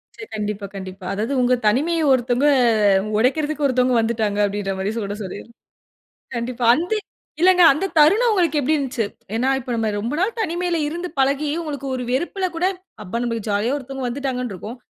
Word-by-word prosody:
சரி, 430 Hz, -, -8 dB
கண்டிப்பா, 210 Hz, -1 st, -3 dB
கண்டிப்பா. 190 Hz, -1 st, -8 dB
அதாது 220 Hz, +6 st, -2 dB
உங்க 250 Hz, 0 st, +3 dB
தனிமைய 315 Hz, +10 st, +2 dB
ஒருத்தங்க 250 Hz, +2 st, +1 dB, 0.7 s
உடைக்கிறதுக்கு 295 Hz, +4 st, +1 dB
ஒருத்தங்க 255 Hz, -1 st, +2 dB
வந்துட்டாங்க 220 Hz, -2 st, 0 dB
அப்டின்ற 200 Hz, -1 st, -1 dB
மாரி 195 Hz, +2 st, -1 dB
சொடச் 205 Hz, -1 st, -4 dB
சொல்லிர். 185 Hz, -, -7 dB, 0.9 s
கண்டிப்பா. 240 Hz, +1 st, -3 dB
அந்த 350 Hz, +8 st, -2 dB, 0.5 s
இல்லங்க 365 Hz, 0 st, +5 dB
அந்த 305 Hz, +8 st, -2 dB
தருணம் 415 Hz, +11 st, +5 dB
உங்களுக்கு 340 Hz, -7 st, +2 dB
எப்டி 300 Hz, +4 st, +1 dB
இருந்துச்சு? 255 Hz, -5 st, -1 dB, 0.3 s
ஏன்னா, 250 Hz, +4 st, +1 dB
இப்ப 255 Hz, 0 st, -8 dB
நம்ம 220 Hz, -1 st, 0 dB
ரொம்ப 235 Hz, +7 st, -3 dB
நாள் 430 Hz, +5 st, 0 dB
தனிமையில 350 Hz, -2 st, -1 dB
இருந்து 345 Hz, +3 st, -4 dB
பழகி 280 Hz, +2 st, +1 dB
உங்களுக்கு 285 Hz, -4 st, -5 dB
ஒரு 250 Hz, -, -4 dB
வெறுப்புல 350 Hz, +8 st, -1 dB
கூட, 345 Hz, -, -1 dB, 0.4 s
அப்பா 210 Hz, +6 st, -3 dB
நமக்கு 230 Hz, -2 st, -3 dB
ஜாலியா 210 Hz, +6 st, 0 dB
ஒருத்தவங்க 270 Hz, -1 st, -5 dB
வந்துட்டாங்கன்னு 250 Hz, -3 st, -3 dB
இருக்கும். 220 Hz, +7 st, -8 dB
255 Hz, 160 wpm, -21 LUFS, 225-310 Hz, 0.9 s, இல்லங்க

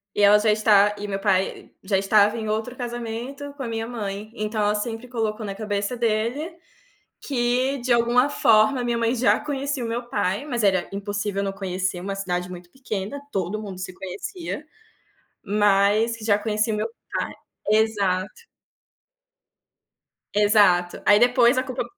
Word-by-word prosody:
E -, -, +1 dB
ela 205 Hz, +1 st, +7 dB
já 215 Hz, 0 st, +3 dB
está 210 Hz, -1 st, +4 dB
e 205 Hz, 0 st, -5 dB
meu 195 Hz, -1 st, -3 dB
pai 195 Hz, -1 st, 0 dB
já 195 Hz, 0 st, +1 dB
estava 205 Hz, +3 st, +3 dB
em 220 Hz, -1 st, -4 dB
outro 220 Hz, +3 st, -2 dB
casamento 245 Hz, +4 st, -5 dB
com 285 Hz, -, -10 dB
a 240 Hz, -, -4 dB
minha 225 Hz, 0 st, -3 dB
mãe, 215 Hz, -2 st, -5 dB
então 215 Hz, -1 st, -3 dB
ela 205 Hz, 0 st, +2 dB
sempre 225 Hz, +3 st, -4 dB
colocou 220 Hz, -3 st, -2 dB
na 195 Hz, -, -4 dB
cabeça 205 Hz, +2 st, -2 dB
dele, 235 Hz, +7 st, -1 dB, 0.7 s
que 255 Hz, +1 st, 0 dB
de 250 Hz, -, +2 dB
alguma 240 Hz, +3 st, +3 dB
forma 220 Hz, +3 st, +4 dB
a 245 Hz, -, -2 dB
minha 240 Hz, -1 st, 0 dB
mãe 230 Hz, +1 st, +1 dB
já 250 Hz, 0 st, +3 dB
conhecia 280 Hz, -3 st, -3 dB
o -, -, -3 dB
meu 240 Hz, +1 st, -4 dB
pai, 220 Hz, 0 st, -1 dB
mas 240 Hz, -6 st, -1 dB
era 190 Hz, -3 st, +2 dB
impossível 200 Hz, 0 st, -3 dB
não 195 Hz, -, -2 dB
conhecer, 190 Hz, -1 st, -3 dB
uma 195 Hz, +2 st, -4 dB
cidade 180 Hz, -2 st, -2 dB
muito 175 Hz, -1 st, -10 dB
pequena, 235 Hz, 0 st, -5 dB
todo 195 Hz, 0 st, -2 dB
mundo 195 Hz, -4 st, -7 dB
se 185 Hz, 0 st, -6 dB
conhecia. 310 Hz, -, -6 dB, 0.8 s
Mas 205 Hz, +2 st, +3 dB
que 225 Hz, -, -10 dB
já 205 Hz, -2 st, +3 dB
conhecia 215 Hz, +1 st, 0 dB
o -, -, -1 dB
meu -, -, -1 dB, 0.3 s
pai, -, -, -3 dB, 0.4 s
exato. 210 Hz, -, 0 dB, 1.9 s
Exato, 205 Hz, -4 st, +3 dB
aí 205 Hz, 0 st, +6 dB
depois 245 Hz, +1 st, +4 dB
a 255 Hz, -, +2 dB
culpa 255 Hz, -2 st, -3 dB
215 Hz, 165 wpm, -24 LUFS, 200-240 Hz, 1.9 s, ela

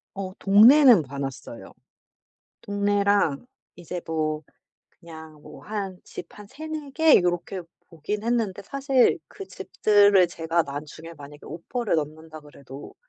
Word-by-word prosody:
어 190 Hz, -1 st, -6 dB
동네는 225 Hz, -, +6 dB
봐 140 Hz, 0 st, -9 dB
놨어요, 130 Hz, -7 st, -7 dB, 0.9 s
동네랑. 205 Hz, -, 0 dB, 0.3 s
이제 175 Hz, +1 st, -7 dB
뭐 155 Hz, -1 st, -2 dB, 0.5 s
그냥 160 Hz, -2 st, -14 dB
뭐 -, -, -13 dB
한 200 Hz, -3 st, -5 dB
집 175 Hz, -, -9 dB
한 210 Hz, -, -11 dB
3-4 310 Hz, +4 st, -8 dB
개 320 Hz, +2 st, +5 dB
요렇게 175 Hz, +1 st, -2 dB, 0.3 s
보긴 190 Hz, +6 st, -5 dB
했는데 225 Hz, -5 st, -1 dB
사실 270 Hz, +2 st, +1 dB
그 395 Hz, -2 st, -11 dB
집들을 205 Hz, -, +3 dB
제가 165 Hz, 0 st, -1 dB
나중에 155 Hz, +4 st, -9 dB
만약에 145 Hz, 0 st, -13 dB
오퍼를 205 Hz, -, -4 dB
넣는다 155 Hz, +1 st, -6 dB
그래도 140 Hz, -2 st, -13 dB
180 Hz, 240 characters per minute, -24 LUFS, 155-210 Hz, 0.9 s, 동네는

